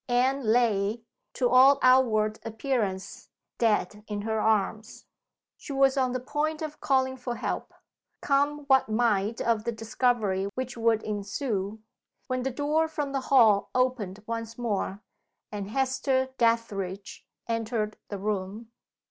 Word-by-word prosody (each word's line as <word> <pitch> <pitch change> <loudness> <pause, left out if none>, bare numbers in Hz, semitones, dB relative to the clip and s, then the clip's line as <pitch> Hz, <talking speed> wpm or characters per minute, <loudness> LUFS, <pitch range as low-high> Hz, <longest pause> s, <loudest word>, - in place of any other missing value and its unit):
Anne 260 +3 +2
lay, 220 -1 +1 0.3
to 250 - +1
all 260 +3 +6
outward 225 -5 +4
appearance, 220 -5 -3 0.3
dead 210 -2 +1
in 205 -1 -3
her 220 0 -1
arms. 215 0 -1 0.5
She 285 - -8
was 270 0 +3
on 260 -2 +1
the 255 - -2
point 305 +5 -2
of 305 -1 -7
calling 260 -1 +1
for 245 -1 -5
help - - -4 0.5
come 285 +1 +1
what 265 -4 +3
might 215 -1 +1
of 230 -2 +1
the 235 - -1
discovery 220 -4 0
which 255 0 -4
would 230 -1 +1
ensue 205 0 -3 0.4
when 255 0 -2
the 265 - -1
door 295 +5 0
from 295 -3 -3
the 270 -1 -1
hall 220 -7 +5
opened 230 -6 0
once 230 0 -5
more, 210 -3 -2 0.5
and 205 -1 -5
Hester 265 +1 0
Dethridge 205 -5 -1 0.2
entered 225 -2 -2
the 205 - -4
room. 205 +2 -4
230 Hz, 135 wpm, -27 LUFS, 210-260 Hz, 0.5 s, all